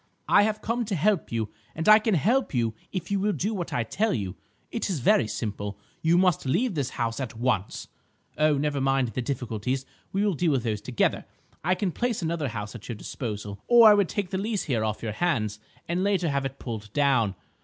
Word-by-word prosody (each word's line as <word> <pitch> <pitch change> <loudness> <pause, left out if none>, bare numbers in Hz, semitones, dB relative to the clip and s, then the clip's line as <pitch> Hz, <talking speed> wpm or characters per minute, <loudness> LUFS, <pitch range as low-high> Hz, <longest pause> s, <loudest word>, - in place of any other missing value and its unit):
I - - +6
have 215 0 0
come 235 +2 0
to 205 -2 -2
help 190 +2 +1
you, 110 -2 -1 0.3
and 160 - -3
I 215 0 +9
can 215 -2 +1
help 225 - +1
you 115 -2 +1 0.2
if 185 -1 -4
you 200 - +2
will 205 +2 +1
do 210 +4 -1
what 180 -5 -4
I 120 - 0
tell 210 - 0
you. 95 -5 -3 0.4
It 230 - -2
is 185 - 0
very 120 -2 +4
simple: 105 -2 -4 0.2
you 165 +2 +4
must 180 -2 +3
leave 230 - +1
this 140 -5 -1
house 115 0 -1
at 125 -4 -5
once. 115 -5 -1 0.5
Oh, 155 -1 +3
never 145 -1 0
mind 135 -2 +2
the 125 - -3
difficulties; 125 0 -2 0.3
we 200 +2 +1
will 205 - +2
deal 165 -1 +1
with 130 -4 0
those 110 -3 -2
together. 120 +1 0 0.4
I 180 +3 +2
can 190 -1 -1
place 235 -1 -1
another 160 -3 -1
house 105 -3 -5
at 120 -2 -10
your 120 - -3
disposal, 105 -3 -6
or 235 -2 +8
I - - +8
would 200 -3 +3
take 200 -4 -3
the 190 - -1
lease 210 0 -1
here 120 -6 0
off 110 0 -2
your 110 - -2
hands, 110 - 0 0.3
and 175 +2 0
later 195 -4 +1
have 140 -1 0
it 135 0 -4
pulled 110 -4 -6
down. 130 -9 +2
140 Hz, 220 wpm, -26 LUFS, -, 0.5 s, I